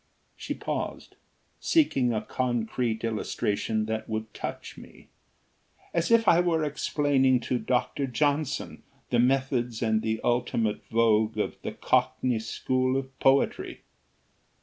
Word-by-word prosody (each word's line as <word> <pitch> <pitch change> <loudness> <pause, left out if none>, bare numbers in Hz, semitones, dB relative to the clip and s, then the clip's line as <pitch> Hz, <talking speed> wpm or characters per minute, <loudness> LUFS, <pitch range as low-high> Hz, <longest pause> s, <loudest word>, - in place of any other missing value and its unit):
She - - -5
paused, - - -5 0.4
seeking 135 - +2
a 110 - -1
concrete 120 -2 -1
illustration 110 -1 -1
that 110 0 -4
would 110 0 -4
touch - - -6
me. - - -15 0.8
"As 170 -1 0
if 230 -2 +4
I 170 - +6
were 170 -3 +2
explaining 145 -3 +2
to 125 +1 -1
Dr. 125 +4 -1
Johnson 145 +3 -1 0.3
the 120 - +3
methods 125 -2 +1
and 110 -1 +2
the 110 0 -1
ultimate 120 -3 0
vogue 110 -1 +2
of 105 - -1
the - - -5
cockney 125 -3 +1
school 130 +3 0
of 135 0 -6
poetry." 135 +1 +2
125 Hz, 125 wpm, -27 LUFS, 110-135 Hz, 0.8 s, I